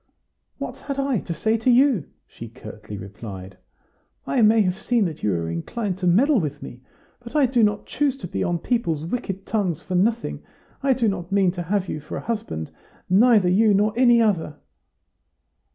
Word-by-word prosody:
"What -, -, -6 dB
had 280 Hz, -1 st, -6 dB
I 275 Hz, -5 st, +1 dB
to 170 Hz, -, -5 dB
say 220 Hz, +8 st, +1 dB
to 225 Hz, +3 st, 0 dB
you?" 250 Hz, -, +4 dB, 0.2 s
she 115 Hz, -, -10 dB
curtly 110 Hz, -3 st, -10 dB
replied. 95 Hz, -1 st, -9 dB, 0.7 s
"I 260 Hz, -, +1 dB
may 220 Hz, 0 st, +5 dB
have 185 Hz, 0 st, -1 dB
seen 235 Hz, -2 st, +1 dB
that 160 Hz, -4 st, -5 dB
you 105 Hz, -, 0 dB
were 85 Hz, -3 st, -1 dB
inclined 185 Hz, -, -3 dB
to 180 Hz, -, -1 dB
meddle 250 Hz, -, +4 dB
with 145 Hz, -4 st, -3 dB
me, 125 Hz, -, -10 dB, 0.4 s
but 245 Hz, +3 st, -12 dB
I 295 Hz, -3 st, +5 dB
do 245 Hz, -1 st, +2 dB
not 210 Hz, -1 st, +1 dB
choose 275 Hz, -1 st, -1 dB
to 180 Hz, -, -7 dB
be -, -, -2 dB
on 175 Hz, -1 st, 0 dB
people's 165 Hz, -7 st, -1 dB
wicked 195 Hz, -1 st, -4 dB
tongues 185 Hz, -7 st, -1 dB
for 185 Hz, -, -6 dB
nothing. 220 Hz, +6 st, 0 dB, 0.4 s
I 275 Hz, -1 st, +3 dB
do 240 Hz, -2 st, 0 dB
not 190 Hz, -3 st, -3 dB
mean 195 Hz, -2 st, +3 dB
to 175 Hz, -1 st, -5 dB
have 190 Hz, +2 st, -1 dB
you 155 Hz, -, -4 dB
for 150 Hz, -, -7 dB
a -, -, -5 dB
husband 145 Hz, -, -4 dB, 0.4 s
neither 210 Hz, -1 st, +5 dB
you 205 Hz, +3 st, +4 dB
nor 210 Hz, +2 st, +2 dB
any 240 Hz, -1 st, +5 dB
other." 185 Hz, -9 st, +1 dB
195 Hz, 190 wpm, -23 LUFS, 160-235 Hz, 0.7 s, may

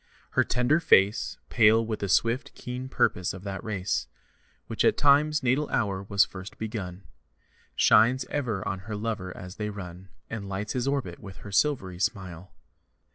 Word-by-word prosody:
Her -, -, +3 dB
tender 125 Hz, +6 st, +2 dB
face, 105 Hz, -, +3 dB
Pale 115 Hz, 0 st, +5 dB
with 110 Hz, -1 st, -3 dB
the 100 Hz, -, -3 dB
swift, 115 Hz, +6 st, +1 dB
keen 125 Hz, +1 st, -6 dB
purpose 90 Hz, -7 st, +1 dB
of 95 Hz, -, -10 dB
that 100 Hz, 0 st, -5 dB
race 100 Hz, -4 st, -2 dB, 0.6 s
Which -, -, -2 dB
at -, -, +3 dB
Time's 150 Hz, +1 st, +4 dB
natal 130 Hz, +4 st, +1 dB
hour 100 Hz, -5 st, 0 dB
was 100 Hz, 0 st, +3 dB
first 95 Hz, +1 st, -10 dB
begun, 100 Hz, -4 st, -5 dB, 0.7 s
Shines 125 Hz, +4 st, +4 dB
ever 120 Hz, -9 st, -2 dB
on 95 Hz, -, -2 dB
her 105 Hz, -, -3 dB
lover 105 Hz, -3 st, -3 dB
as 90 Hz, +1 st, -9 dB
they 105 Hz, -1 st, -3 dB
run 95 Hz, -2 st, -9 dB, 0.2 s
And 100 Hz, -3 st, -6 dB
lights 100 Hz, +2 st, -3 dB
his 125 Hz, 0 st, -1 dB
orbit 135 Hz, -12 st, -2 dB
with 95 Hz, -3 st, -10 dB
her 100 Hz, -, -7 dB
silvery 95 Hz, -6 st, +1 dB
smile. 95 Hz, -3 st, -3 dB
105 Hz, 165 wpm, -27 LUFS, 95-125 Hz, 0.7 s, Pale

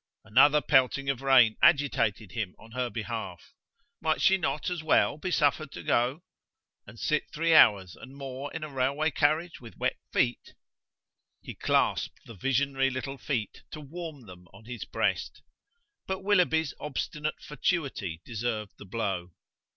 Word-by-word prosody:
Another 140 Hz, +7 st, +5 dB
pelting 135 Hz, +1 st, +3 dB
of 135 Hz, -2 st, -6 dB
rain 130 Hz, -5 st, +5 dB
agitated 115 Hz, -, +2 dB
him 100 Hz, -2 st, -4 dB
on 115 Hz, -, -16 dB
her 125 Hz, 0 st, -2 dB
behalf. 110 Hz, -7 st, -6 dB, 0.5 s
Might 160 Hz, -1 st, +1 dB
she 190 Hz, -, +5 dB
not 180 Hz, -2 st, -2 dB
as 175 Hz, -3 st, -3 dB
well 155 Hz, -1 st, +2 dB
be 185 Hz, -, -3 dB
suffered 150 Hz, -3 st, +1 dB
to -, -, -8 dB
go? 130 Hz, +8 st, +1 dB, 0.6 s
and 115 Hz, -, -12 dB
sit 150 Hz, -, 0 dB
three 165 Hz, +2 st, +1 dB
hours 95 Hz, -, +6 dB
and 130 Hz, +3 st, -13 dB
more 135 Hz, +1 st, -6 dB
in 160 Hz, -, -5 dB
a -, -, -4 dB
railway 140 Hz, +4 st, +1 dB
carriage 155 Hz, +4 st, 0 dB
with 115 Hz, -6 st, -12 dB
wet -, -, -1 dB
feet! -, -, 0 dB, 0.9 s
He -, -, -7 dB
clasped -, -, 0 dB
the 115 Hz, -, -10 dB
visionary 135 Hz, +5 st, +1 dB
little 135 Hz, +1 st, -5 dB
feet 120 Hz, -7 st, -3 dB
to 155 Hz, -, -6 dB
warm 150 Hz, -2 st, -8 dB
them 90 Hz, -2 st, -13 dB
on 100 Hz, +3 st, -16 dB
his 120 Hz, 0 st, -6 dB
breast. -, -, -2 dB, 0.6 s
But 190 Hz, 0 st, -3 dB
Willoughby's 175 Hz, -6 st, +2 dB
obstinate 150 Hz, +1 st, -4 dB
fatuity 135 Hz, -, -2 dB
deserved 110 Hz, -3 st, -4 dB
the -, -, -10 dB
blow! 95 Hz, -4 st, -3 dB
135 Hz, 150 wpm, -28 LUFS, 115-150 Hz, 0.9 s, hours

